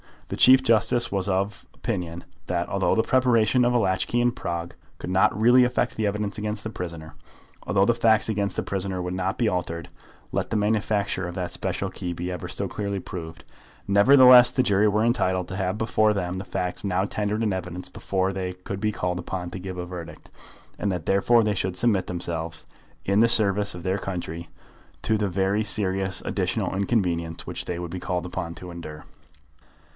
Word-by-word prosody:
The - - -4
Chief 130 +1 +7
Justice 120 0 +2
was 100 -1 -1
of 100 +1 -1
opinion 85 -1 -4 0.2
that, - - -1
although - - +1
the 110 - +3
preparation 125 -2 +3
of 120 - +2
a - - +4
latch 95 -4 +1
key 120 - 0
in 120 0 +3
Prague 85 -5 -5 0.2
could - - -7
not 95 +1 +3
really 120 +3 +6
affect 125 0 0
the 110 -1 0
evidence 105 0 -2
against 105 0 -3
the 110 - -5
prisoner, 85 -5 -7 0.5
although 100 -1 +3
the 120 - +3
facts 110 -2 +3
against 100 -2 -1
the - - -1
prisoner 95 -1 -3
would 90 0 -3
not 95 +2 -2
be 120 - +1
altered, 85 -2 -3 0.4
let - - -2
the - - -2
manufacture 105 -3 0
of 90 - -7
that 90 -2 -3
special 95 +1 -3
key 90 -1 -4
be 90 +2 -4
ever 90 -3 -5
so - - -3
clearly 100 -1 -3
proved, 85 -3 -8 0.4
nevertheless 125 +4 +8
the 130 - +1
jury 105 -2 +3
were 105 +1 +2
entitled 95 -6 +1
to 95 - -5
have 95 0 -1
before 110 -1 +2
them 90 -2 -3
the 95 - -6
facts 90 +1 -3
now 95 -1 0
tendered 105 +2 -2
in 105 -3 +1
evidence 90 -1 -5
before 95 0 -1
they 95 -1 -4
could 90 +2 -7
be 105 +1 0
called 90 -1 -2
upon 90 0 -5
to 95 - -6
give 95 0 -6
a 90 - -4
verdict, 85 -1 -9 0.5
and 100 - 0
that 90 -4 -4
therefore 115 +4 +4
they 105 -1 +1
should 95 -2 -2
submit 100 -4 +2
themselves, 85 -2 -4 0.4
in 100 +1 +2
the 115 - +6
service 105 -3 +3
of 90 - -9
their 95 +2 0
country, 85 -3 -5 0.6
to 110 - +2
the 105 -1 0
very 95 +3 +1
serious 95 -3 0
additional - - -1
inconvenience 90 -5 -1
which - - -6
they 90 - -3
would 85 -1 -5
be 90 - -4
called 90 0 -3
upon 85 -2 -5
to 90 -1 -9
endure. 80 -3 -9
95 Hz, 200 wpm, -25 LUFS, 90-105 Hz, 0.6 s, nevertheless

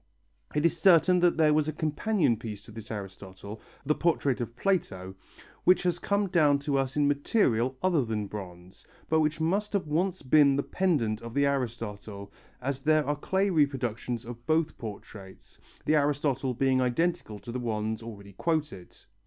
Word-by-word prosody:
It 150 +2 +1
is 170 - +3
certain 180 0 +5
that 175 -1 +3
there 155 -2 +4
was 155 0 +2
a - - 0
companion 155 - 0
piece 105 -3 -8
to - - -14
this 110 0 -10
Aristotle, 100 0 -8 0.2
the 150 - +3
portrait 145 -6 0
of 120 0 -5
Plato, 100 - -1 0.5
which 185 +1 +4
has 175 -1 0
come 200 +2 0
down 155 -6 +3
to 145 -1 -1
us 135 +1 -2
in 145 -1 +3
material 135 - +1
other 175 -7 +3
than 110 -3 -3
bronze, 90 -3 -10 0.3
but 160 - +3
which 155 +1 0
must 195 +7 0
have 200 -4 0
once 175 +4 -1
been 140 +1 +5
the 140 - 0
pendant 125 - 0
of 115 0 -9
the 140 0 +3
Aristotle, 110 -7 -4 0.3
as 135 0 -2
there 155 +1 +3
are 145 +2 0
clay 190 +6 0
reproductions 125 -7 -1
of 120 0 -9
both 160 0 +1
portraits, 100 -3 -10 0.3
the 155 - +3
Aristotle 140 -3 0
being 130 +1 +2
identical 125 -3 -1
to 105 +4 -9
the 125 - -3
ones 110 -2 -2
already 100 -3 -10
quoted. 150 - -3
140 Hz, 170 wpm, -28 LUFS, 110-160 Hz, 0.5 s, certain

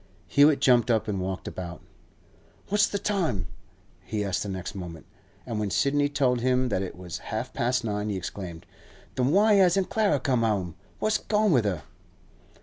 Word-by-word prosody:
Hewett 145 0 +5
jumped 125 -4 +4
up 115 -2 +2
and 100 -3 -2
walked 95 0 -4
about. 90 -1 -6 0.9
'What's 205 +1 +4
the 200 - -2
time?' 190 - -1 0.6
he 105 -1 -3
asked 95 -3 -1
the 100 - -3
next 95 +1 -5
moment. 85 -5 -8 0.4
And 115 -3 -3
when 105 -1 -1
Sidney 145 +7 +2
told 130 -4 +1
him 130 0 +2
that 95 - 0
it 95 - -5
was 90 -2 -7
half - - -3
past 125 +1 0
nine, 105 -1 -2
he 100 - -2
exclaimed, 90 -2 -7 0.5
'Then 125 0 +1
why 210 +6 +5
hasn't 190 -1 +3
Clara 205 -9 +2
come 130 -3 +1
'ome? 100 -6 0 0.2
What's 215 0 +1
gone 210 -1 +1
with 125 -8 +3
her? 90 -7 -1
120 Hz, 175 wpm, -26 LUFS, 95-145 Hz, 0.9 s, Hewett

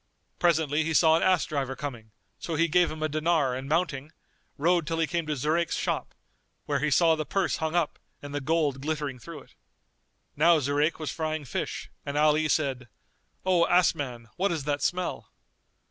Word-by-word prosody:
Presently 160 -3 +2
he 160 0 -2
saw 160 0 +6
an 165 - +1
ass 185 -2 +3
driver 135 -3 -3
coming, 120 -7 -7 0.3
so 165 - -4
he 165 +2 +3
gave 175 +2 +3
him 155 0 -5
a - - +2
dinar 155 -3 +1
and 130 +2 -5
mounting, 155 -3 -1 0.5
rode 170 +1 +2
till 165 0 -1
he 165 - +2
came 170 0 -2
to 150 - -1
Zurayk's 155 +5 0
shop, - - -2 0.5
where 145 -2 0
he 150 +3 0
saw 165 +3 +4
the 155 - -2
purse 195 +5 -1
hung 160 +1 -2
up 170 -4 0 0.2
and 145 0 -9
the 145 - -2
gold 145 -2 0
glittering 145 -3 -3
through 155 +3 -9
it. - - -20 0.8
Now 165 +3 +5
Zurayk 145 +3 +1
was 155 -2 -4
frying 155 -2 -3
fish, 120 - -4
and 140 +1 -4
Ali 155 +1 +3
said, 135 -5 0 0.6
"O 180 -2 +3
ass 180 0 +4
man, 125 -7 -6
what 195 +1 +1
is 160 -4 -2
that 145 0 -1
smell?" 180 0 -2
155 Hz, 190 wpm, -27 LUFS, 145-165 Hz, 0.8 s, saw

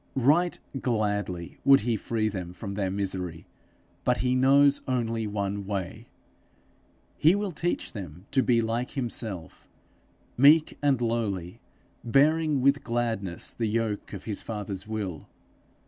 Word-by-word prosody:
Right 150 +7 +3 0.2
gladly 105 -7 -2
would 135 0 +6
he 115 +1 0
free 110 +1 -1
them 90 -4 -5
from 100 +1 -6
their 100 -1 -1
misery 95 -4 -3 0.6
but 125 0 +1
he 125 0 +1
knows 140 +2 +5
only 115 -3 -1
one 100 -1 -3
way: 100 +3 -4 1.1
he 165 +5 +5
will 205 -1 -2
teach 175 +2 -2
them 90 -3 -8
to 135 - +3
be 120 -3 +3
like 115 +3 -2
himself, 110 -8 -3 0.7
meek 150 +5 +6
and 140 -4 +2
lowly, 105 -7 -2 0.4
bearing 150 +3 +3
with 140 +2 +3
gladness 115 -7 -2
the 115 - -1
yoke 110 -1 -2
of 100 - -7
his 105 -3 -3
father's 105 -3 -5
will. 100 -8 -4
115 Hz, 130 wpm, -27 LUFS, 100-130 Hz, 1.1 s, would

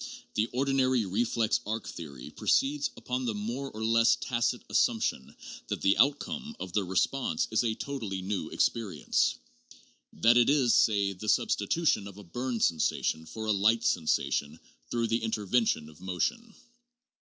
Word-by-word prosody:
The 110 +1 +1
ordinary 130 -2 +1
re 100 +5 0
flex 115 -2 +1
arc 110 +1 -4
theory 70 -6 -8
proceeds 145 +1 +1
upon 125 0 -3
the 115 -3 -1
more 120 +7 -4
or 110 -1 -5
less 115 +1 +4
tacit 120 -2 -1
assumption 65 - 0 0.3
that - - -4
the 100 +1 +4
outcome 220 - +1
of 90 - -6
the 105 - +1
response 95 +1 0
is 110 - +2
a 110 -2 0
totally 110 -10 -4
new 100 0 -3
experience; 100 -10 0 0.8
that 120 +1 +4
it 120 +1 +5
is, 135 -5 +3
say, 100 -2 +3
the 105 +3 -5
substitution 105 -1 +1
of 100 -1 -11
a 105 - -10
burn 120 +6 -3
sensation 80 -2 0
for 110 +7 -6
a 110 - +1
light 110 +3 +3
sensation 80 -5 0 0.3
through 120 -1 0
the 115 +1 0
intervention 110 -6 0
of 80 +2 -16
motion. 220 - -2
110 Hz, 155 wpm, -29 LUFS, 95-125 Hz, 0.8 s, it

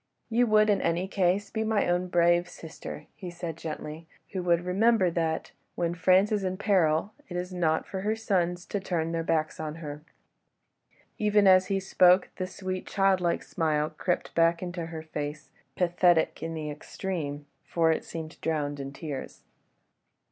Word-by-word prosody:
"You 240 +2 +3
would 215 -1 +5
in 200 - +2
any 175 +3 0
case 195 +1 +1
be 220 - -1
my 220 -1 +1
own 175 +1 +1
brave 175 0 +3
sister," 165 -2 -9
he 185 -4 -8
said 170 -2 -5
gently, 160 0 -7 0.2
"who 190 - -2
would 170 -1 +2
remember 195 0 +3
that, 165 -1 -1 0.2
when 170 -1 0
France 185 +4 +4
is 210 -2 0
in 185 0 -2
peril, 185 -2 +2 0.2
it 175 - -4
is 180 +1 -4
not 160 -3 +1
for 190 - -5
her 215 +2 0
sons 180 -5 0
to 205 - -2
turn 165 -4 -2
their 165 0 -1
backs 160 -1 -1
on 155 -1 -4
her." 150 -2 -7 1.2
Even 210 -1 +3
as 185 -1 +6
he 195 -1 0
spoke, 185 -1 +4
that 185 - -2
sweet, 185 0 -5
childlike 190 -3 +2
smile 155 -1 0
crept 180 - -2
back 165 +1 +3
into 175 -2 -4
her 160 -1 -7
face, 150 -1 -6 0.2
pathetic 175 -2 +2
in 165 +1 -4
the 155 -1 -4
extreme, 150 -2 -5 0.2
for 165 -1 +2
it 160 - -1
seemed 160 -1 -8
drowned 145 -3 -1
in 135 0 -5
tears. 140 -1 -7
175 Hz, 170 wpm, -28 LUFS, 160-190 Hz, 1.2 s, as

